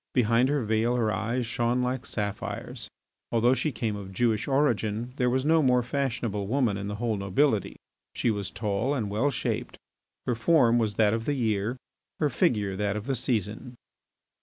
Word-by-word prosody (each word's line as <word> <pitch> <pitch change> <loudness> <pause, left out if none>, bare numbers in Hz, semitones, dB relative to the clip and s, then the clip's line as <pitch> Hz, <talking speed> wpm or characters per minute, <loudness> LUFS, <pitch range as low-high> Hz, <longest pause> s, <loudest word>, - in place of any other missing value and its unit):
Behind 120 +1 +3
her 145 -3 +1
veil 110 +3 +1
her 115 -3 +1
eyes 115 +5 -1
shone 120 +1 0
like 125 +1 -2
sapphires. 100 -2 -4 0.4
Although 120 +2 +4
she 150 +3 0
came 110 -3 -2
of 100 -2 -7
Jewish 110 +3 +1
origin 120 -4 0
there 125 -2 +2
was 130 +2 0
no 160 +1 +4
more 125 -3 +3
fashionable 120 -6 -2
woman 120 -3 +1
in 100 0 -4
the 105 - -3
whole 115 -1 -1
nobility. 100 +3 +1 0.4
She 120 - +1
was 100 -2 -3
tall 105 +6 -1
and 105 -7 -2
well 110 +8 +1
shaped; 135 - -3 0.5
her 125 - +1
form 120 -1 +4
was 110 -3 0
that 105 -1 +3
of 115 0 -2
the 145 - 0
year, 110 -1 0 0.4
her 150 -3 +1
figure 105 - +1
that 100 0 0
of 105 0 -4
the 135 0 0
season. 120 0 -2
115 Hz, 180 wpm, -27 LUFS, 105-130 Hz, 0.5 s, Although